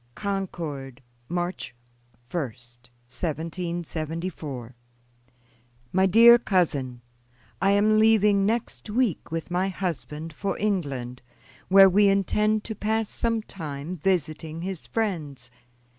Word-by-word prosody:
"Concord, 165 Hz, -10 st, -4 dB, 0.3 s
March 175 Hz, -7 st, -3 dB, 0.6 s
1, 175 Hz, -, 0 dB
1774. 150 Hz, +4 st, -5 dB, 1.2 s
"MY 190 Hz, +1 st, +4 dB
DEAR 235 Hz, +5 st, +8 dB
COUSIN: 145 Hz, -, 0 dB, 0.6 s
I 195 Hz, -, +3 dB
am 215 Hz, +1 st, +4 dB
leaving 210 Hz, -2 st, +4 dB
next 225 Hz, +1 st, -2 dB
week 225 Hz, -, 0 dB
with 165 Hz, +2 st, -4 dB
my 185 Hz, +2 st, +1 dB
husband 165 Hz, -4 st, -4 dB
for 195 Hz, +5 st, -3 dB
England, 140 Hz, -12 st, -2 dB, 0.5 s
where 195 Hz, 0 st, +8 dB
we 200 Hz, +2 st, +4 dB
intend 210 Hz, +2 st, +1 dB
to 220 Hz, -, -5 dB
pass 220 Hz, +1 st, -1 dB
some 230 Hz, -2 st, -1 dB
time 155 Hz, -3 st, -6 dB
visiting 160 Hz, -2 st, -2 dB
his 190 Hz, -3 st, -5 dB
friends. 150 Hz, -, -3 dB
175 Hz, 100 wpm, -25 LUFS, 150-200 Hz, 1.2 s, DEAR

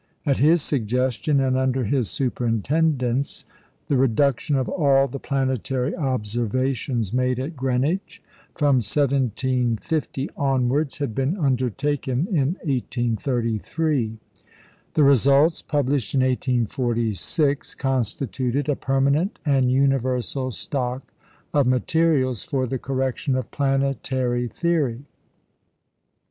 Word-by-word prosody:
At 140 Hz, -3 st, +2 dB
his 155 Hz, +3 st, +4 dB
suggestion, 130 Hz, +3 st, 0 dB
and 130 Hz, -1 st, +1 dB
under 130 Hz, 0 st, +1 dB
his 120 Hz, 0 st, 0 dB
superintendence, 130 Hz, +2 st, 0 dB, 0.4 s
the 140 Hz, -, +2 dB
reduction 135 Hz, +3 st, +2 dB
of 130 Hz, -2 st, 0 dB
all 140 Hz, -5 st, +3 dB
the 140 Hz, +1 st, -6 dB
planetary 130 Hz, -1 st, -1 dB
observations 120 Hz, -, -1 dB
made 125 Hz, 0 st, +1 dB
at 145 Hz, +6 st, -4 dB
Greenwich 140 Hz, +7 st, -1 dB, 0.4 s
from 145 Hz, -3 st, +3 dB
1750 130 Hz, +2 st, 0 dB
onwards 135 Hz, 0 st, 0 dB
had 140 Hz, -6 st, -3 dB
been 135 Hz, -, -1 dB
undertaken 135 Hz, -, 0 dB
in 155 Hz, -1 st, +1 dB
1833. 120 Hz, 0 st, -1 dB, 0.8 s
The 155 Hz, -, +4 dB
results, 140 Hz, +4 st, +4 dB
published 140 Hz, -5 st, -1 dB
in 130 Hz, -, +4 dB
1846, 125 Hz, -, 0 dB
constituted 130 Hz, +1 st, -1 dB
a 145 Hz, -, +2 dB
permanent 140 Hz, +9 st, +1 dB
and 135 Hz, -4 st, +3 dB
universal 130 Hz, -1 st, +1 dB
stock 130 Hz, +1 st, -4 dB, 0.4 s
of 145 Hz, -3 st, +3 dB
materials 130 Hz, -2 st, +1 dB
for 130 Hz, -2 st, -1 dB
the 130 Hz, +1 st, -3 dB
correction 130 Hz, 0 st, -1 dB
of 130 Hz, -, -3 dB
planetary 135 Hz, -3 st, 0 dB
theory. 140 Hz, -5 st, -1 dB
130 Hz, 100 wpm, -23 LUFS, 125-140 Hz, 0.8 s, his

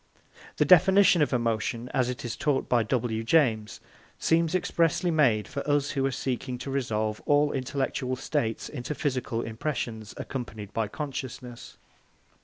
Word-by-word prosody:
The -, -, +3 dB
definition 190 Hz, 0 st, +6 dB
of 150 Hz, -, +2 dB
emotion, 115 Hz, -1 st, -1 dB
as 125 Hz, -1 st, +1 dB
it 125 Hz, 0 st, -5 dB
is 120 Hz, -, -3 dB
taught 145 Hz, -3 st, 0 dB
by 120 Hz, -1 st, +3 dB
W. 115 Hz, -1 st, -1 dB
James, 110 Hz, -6 st, +2 dB, 0.4 s
seems 165 Hz, +1 st, +2 dB
expressly 170 Hz, 0 st, +1 dB
made 125 Hz, -10 st, +3 dB
for 140 Hz, -1 st, -4 dB
us 145 Hz, 0 st, +2 dB
who 135 Hz, -2 st, -1 dB
are -, -, -2 dB
seeking 125 Hz, -1 st, -3 dB
to 130 Hz, +2 st, -6 dB
resolve 110 Hz, -5 st, -1 dB
all 145 Hz, 0 st, +4 dB
intellectual 130 Hz, -1 st, -2 dB
states 125 Hz, -4 st, -2 dB
into 145 Hz, +1 st, -5 dB
physical 125 Hz, -5 st, -2 dB
impressions 115 Hz, -3 st, -4 dB
accompanied 110 Hz, -6 st, -6 dB
by 110 Hz, -2 st, 0 dB
consciousness. 130 Hz, -2 st, -7 dB
130 Hz, 145 wpm, -27 LUFS, 115-145 Hz, 0.4 s, definition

